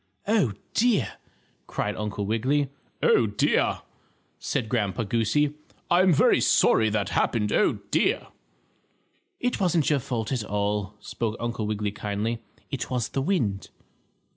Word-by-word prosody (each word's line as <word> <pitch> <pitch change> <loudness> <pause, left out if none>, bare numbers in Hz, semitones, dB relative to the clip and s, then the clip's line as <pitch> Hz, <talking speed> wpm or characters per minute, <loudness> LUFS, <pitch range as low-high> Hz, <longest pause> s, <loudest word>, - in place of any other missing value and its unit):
"Oh, 205 - +2 0.2
dear!" 235 -3 +2 0.6
cried 105 - -2
Uncle 105 -1 -3
Wiggily. 130 +6 0 0.3
"Oh, 115 - +4
dear!" 100 0 +1 0.6
said 125 -5 -2
Grandpa 110 -2 -1
Goosey. 115 +7 +1 0.4
"I'm 185 +1 +5
very 150 - +4
sorry 110 - +4
that 105 -1 -1
happened. 105 -3 +1
Oh, - - +3 0.2
dear!" - - +2 1.1
"It 245 0 -1
wasn't 175 -6 +2
your 145 - +3
fault 115 -3 -3
at 125 -5 -1
all," 105 0 -2
spoke 110 +1 -3
Uncle 115 -2 -2
Wiggily 105 -1 -1
kindly. 105 +3 -3 0.3
"It 130 -3 -3
was 125 -3 -1
the 135 - -2
wind." 125 - -1
115 Hz, 130 wpm, -26 LUFS, 105-140 Hz, 1.1 s, I'm